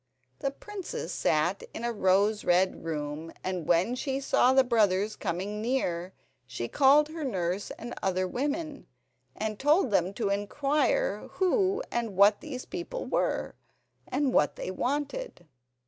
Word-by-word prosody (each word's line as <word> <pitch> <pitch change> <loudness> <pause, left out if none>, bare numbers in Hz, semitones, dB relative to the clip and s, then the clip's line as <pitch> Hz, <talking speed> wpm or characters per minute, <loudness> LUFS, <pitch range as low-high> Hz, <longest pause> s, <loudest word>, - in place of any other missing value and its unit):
The 275 - 0
princess 390 +7 -6
sat - - +1
in - - -5
a 235 0 -1
rose 205 +1 +2
red 185 +2 +2
room, 155 0 -4
and 180 -4 -3
when 175 +8 +3
she 270 +1 -2
saw 260 -2 +3
the 265 0 +5
brothers 215 -4 +2
coming 200 +3 -3
near 185 -7 -1 0.3
she 120 -2 -4
called 290 - +5
her 320 0 -6
nurse 190 -6 -2
and 240 - -7
other 185 -1 0
women, 290 - -3 0.5
and 215 -1 -3
told 295 - +3
them 185 -2 +2
to 210 -3 -1
inquire 290 - 0
who 390 +3 +1
and 230 -4 -2
what 205 +1 +6
these 265 -5 -6
people 375 +8 -5
were, - - -1 0.5
and 270 -1 0
what 145 - +3
they - - -4
wanted. 290 - -3
230 Hz, 145 wpm, -28 LUFS, 185-290 Hz, 0.5 s, what